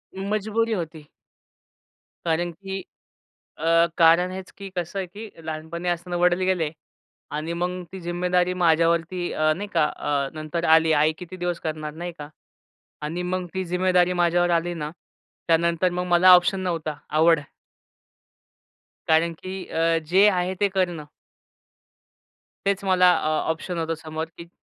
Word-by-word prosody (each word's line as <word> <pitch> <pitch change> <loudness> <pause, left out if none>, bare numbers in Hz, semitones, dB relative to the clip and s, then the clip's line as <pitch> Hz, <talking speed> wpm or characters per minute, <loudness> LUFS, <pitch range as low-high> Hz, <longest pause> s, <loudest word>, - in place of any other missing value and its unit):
मजबुरी 215 +3 -1
होती. 160 -5 -5 1.2
कारण 170 +1 0
की 195 +2 -6 0.8
अ, 165 +1 +4
कारण 170 +2 +5
हेच 190 0 -7
की 200 -1 -8
कसं 175 +2 -3
आहे 190 - -2
की 210 +5 -9 0.2
लहानपणी 160 +2 -5
असताना 175 0 -2
वडील 175 0 +3
गेले 175 -5 +1 0.6
आणि 155 +2 -3
मग 180 +1 -2
ती 190 - -7
जिम्मेदारी 180 +1 0
माझ्यावरती 165 +1 +2
अ, 155 0 +2
नाही 205 +3 -5
का 165 -2 +4
अ, 140 -2 -1
नंतर 155 +2 -4
आली. 160 0 +5
आई 155 +1 +3
किती 180 0 -9
दिवस 175 -1 -3
करणार 155 -1 -4
नाही 175 +2 -5
का? 145 -1 -7 0.7
आणि 165 +4 -3
मग 180 0 -2
ती 190 0 -1
जिम्मेदारी 180 0 +2
माझ्यावर 175 +1 +2
आली 175 +1 -2
ना 150 -2 -4 0.6
त्यानंतर 170 +2 +2
मग 180 +1 -2
मला 180 +1 +6
ऑप्शन 180 +2 +3
नव्हता 165 -4 -2
आवड 160 +1 +4 1.7
कारण 165 +1 +3
की 185 +3 -7
अ, 165 0 +1
जे 195 +3 +6
आहे 180 +1 0
ते 205 - +5
करणं. 180 -5 -1 1.6
तेच 200 0 0
मला 180 -1 +5
अ, - - -2 0.2
ऑप्शन 170 +2 -5
होतं 165 0 -1
समोर, 160 0 -4
की 170 - -10
175 Hz, 145 wpm, -24 LUFS, 160-185 Hz, 1.7 s, मला